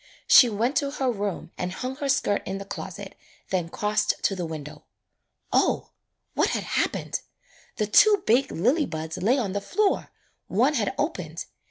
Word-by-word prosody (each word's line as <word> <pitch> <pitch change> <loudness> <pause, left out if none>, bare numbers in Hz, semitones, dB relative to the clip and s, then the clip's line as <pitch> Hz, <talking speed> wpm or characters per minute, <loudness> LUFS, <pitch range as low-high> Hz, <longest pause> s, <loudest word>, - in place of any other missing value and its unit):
She 245 - +8
went 230 +6 0
to 280 - +1
her 270 -3 -1
room 200 -5 -4
and 180 0 -2
hung 255 +5 -5
her 285 -2 -3
skirt 205 -7 +1
in 190 - -3
the 195 - -7
closet, - - -7 0.4
then 180 -3 0
crossed 210 +3 0
to 195 - +2
the 175 -3 -3
window. 150 -2 -8 0.7
O, - - +2 0.4
what - - +2
had - - -1
happened! - - -1 0.5
The 215 - 0
two 405 - +5
big 255 +4 +3
lily 260 - +1
buds 160 +1 -5
lay 220 +9 +2
on 220 -8 -1
the 200 +1 -2
.floor, 410 - 0 0.4
one - - +2
had - - -1
opened. - - -3
210 Hz, 170 wpm, -25 LUFS, 185-265 Hz, 0.7 s, She